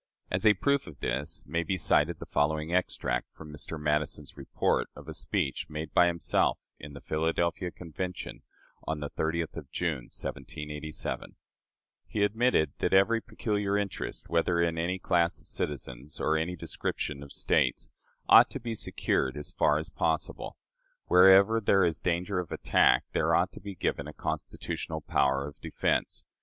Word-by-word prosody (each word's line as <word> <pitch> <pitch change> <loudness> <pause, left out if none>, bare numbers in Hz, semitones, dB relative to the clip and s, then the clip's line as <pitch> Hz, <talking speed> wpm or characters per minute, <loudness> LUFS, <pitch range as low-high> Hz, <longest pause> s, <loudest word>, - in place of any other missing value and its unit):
As 110 - +2
a 105 - +7
proof 140 +6 +1
of 75 -5 -11
this, 70 +2 -3
may 85 +2 -1
be 90 +3 -1
cited 80 0 +2
the - - -8
following 75 +3 0
extract 60 -9 0
from 75 -1 -10
Mr. 75 +2 -6
Madison's 75 -1 -1
report 70 -2 0
of - - -12
a - - -5
speech 70 +5 -2
made 75 -1 -5
by 90 - +6
himself 85 -1 +1 0.2
in 75 0 -9
the 70 - -10
Philadelphia 85 +3 0
Convention 90 +1 -6 0.5
on 80 -1 -1
the 75 -1 -5
30th 80 0 -2
of - - -8
June, 75 -9 -2
1787: 75 0 -5 0.7
"He 105 - 0
admitted 105 - +2
that - - +2
every 115 +4 +4
peculiar 105 -3 -1
interest, 100 -2 -4
whether 85 +1 +1
in 85 -1 +1
any 90 +3 0
class 85 -2 +1
of - - -17
citizens 70 0 -4
or 80 - +2
any 80 +3 -1
description 75 -3 -4
of 70 -1 -10
States, - - +1 0.4
ought - - +8
to - - -5
be 115 -1 -4
secured 65 - -1
as 75 - -4
far 75 - +3
as 80 +1 -5
possible. 80 -1 -2 0.5
Wherever 95 +5 +7
there 95 -2 +4
is 80 -3 0
danger 90 +2 0
of 90 - -5
attack, - - +3
there - - +2
ought - - +2
to - - -11
be 100 -1 -7
given 70 -4 -2
a 75 - -8
constitutional 80 0 -4
power 70 -1 +1
of 75 - -12
defense. - - -1
80 Hz, 165 wpm, -29 LUFS, 75-90 Hz, 0.7 s, ought